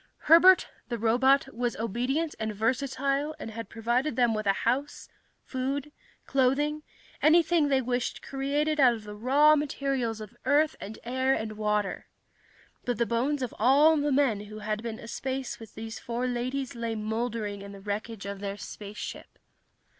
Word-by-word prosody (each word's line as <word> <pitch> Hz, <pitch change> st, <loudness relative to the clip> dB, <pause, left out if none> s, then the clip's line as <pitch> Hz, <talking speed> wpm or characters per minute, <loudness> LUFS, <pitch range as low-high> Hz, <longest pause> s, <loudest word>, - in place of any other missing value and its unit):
Herbert, 350 Hz, +4 st, +7 dB, 0.2 s
the 240 Hz, -, -2 dB
robot, 265 Hz, +5 st, +3 dB
was 240 Hz, 0 st, -1 dB
obedient 250 Hz, +9 st, -1 dB
and 220 Hz, -1 st, -3 dB
versatile 275 Hz, +6 st, 0 dB
and 225 Hz, -, -7 dB
had 225 Hz, -2 st, -7 dB
provided 240 Hz, +5 st, 0 dB
them 240 Hz, -2 st, +3 dB
with 215 Hz, -1 st, -2 dB
a 195 Hz, -, +5 dB
house, 270 Hz, +5 st, -1 dB, 0.3 s
food, 275 Hz, +3 st, -3 dB, 0.3 s
clothing, 275 Hz, +3 st, +1 dB, 0.4 s
anything 325 Hz, 0 st, +4 dB
they 270 Hz, -2 st, +2 dB
wished 245 Hz, 0 st, -2 dB
created 290 Hz, +3 st, -1 dB
out 250 Hz, -4 st, +6 dB
of 220 Hz, -, -10 dB
the 210 Hz, 0 st, -8 dB
raw 265 Hz, +8 st, +4 dB
elements 275 Hz, -6 st, 0 dB
of 215 Hz, +2 st, -9 dB
earth 300 Hz, +2 st, +3 dB
and 210 Hz, +2 st, -7 dB
air 260 Hz, +2 st, +1 dB
and 220 Hz, 0 st, -3 dB
water. 210 Hz, -1 st, -1 dB, 0.8 s
But 245 Hz, -3 st, -1 dB
the 235 Hz, -, +2 dB
bones 260 Hz, +5 st, 0 dB
of 250 Hz, -, -4 dB
all 285 Hz, +7 st, +6 dB
the 295 Hz, -1 st, 0 dB
men 255 Hz, -7 st, +2 dB
who 215 Hz, +1 st, -9 dB
had 215 Hz, 0 st, -3 dB
been 230 Hz, -1 st, -5 dB
aspace 260 Hz, +2 st, -4 dB
with 225 Hz, -2 st, -12 dB
these 225 Hz, +1 st, -6 dB
four 240 Hz, +1 st, -3 dB
ladies 255 Hz, +2 st, -2 dB
lay 230 Hz, -1 st, -3 dB
mouldering 215 Hz, -1 st, -3 dB
in 200 Hz, 0 st, -9 dB
the 200 Hz, -, -10 dB
wreckage 205 Hz, +1 st, -5 dB
of 200 Hz, 0 st, -5 dB
their 200 Hz, 0 st, -4 dB
spaceship. 205 Hz, 0 st, -8 dB
245 Hz, 160 wpm, -28 LUFS, 220-275 Hz, 0.8 s, Herbert